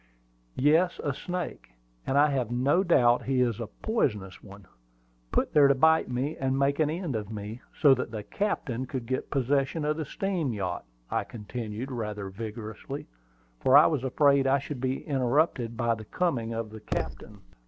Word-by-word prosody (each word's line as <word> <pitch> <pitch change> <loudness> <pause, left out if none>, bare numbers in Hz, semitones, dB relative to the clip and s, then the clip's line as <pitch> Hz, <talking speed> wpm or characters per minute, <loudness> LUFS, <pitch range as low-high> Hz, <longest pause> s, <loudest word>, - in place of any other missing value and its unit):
"Yes, 160 +6 +3
a 145 - 0
snake; 180 - -5 0.3
and 135 - +1
I 145 +1 +5
have 130 -5 -1
no 135 +9 +2
doubt 125 -9 +4
he 130 -1 +1
is 120 -3 +1
a 115 - -4
poisonous 105 - -2
one, 100 -1 -13 0.7
put - - 0
there 145 -2 +7
to 140 - +4
bite 160 +3 +4
me, 130 +5 -2
and 135 0 0
make 140 +1 +1
an 155 -2 +3
end 165 -4 -3
of 105 -2 -3
me, 105 +3 -6 0.2
so 140 -3 +7
that 125 -1 -2
the 110 -2 -5
captain 130 - -2
could 130 -3 -4
get 130 +2 -3
possession 140 +3 0
of 150 +1 0
the 160 - -3
steam 175 -5 -2
yacht!" 95 -4 -3 0.3
I - - +1
continued, 115 +2 -6
rather 105 -5 -4
vigorously, 110 +5 -6 0.5
for 130 +2 +6
I 150 - +8
was 145 -5 +1
afraid 140 +1 +3
I 135 +1 +4
should 140 -1 -6
be 130 +1 -2
interrupted 130 -3 +1
by 115 0 +2
the 110 -1 -7
coming 125 - -1
of 115 -1 -4
the 110 - -9
captain. - - -5
130 Hz, 180 wpm, -28 LUFS, 115-145 Hz, 0.7 s, I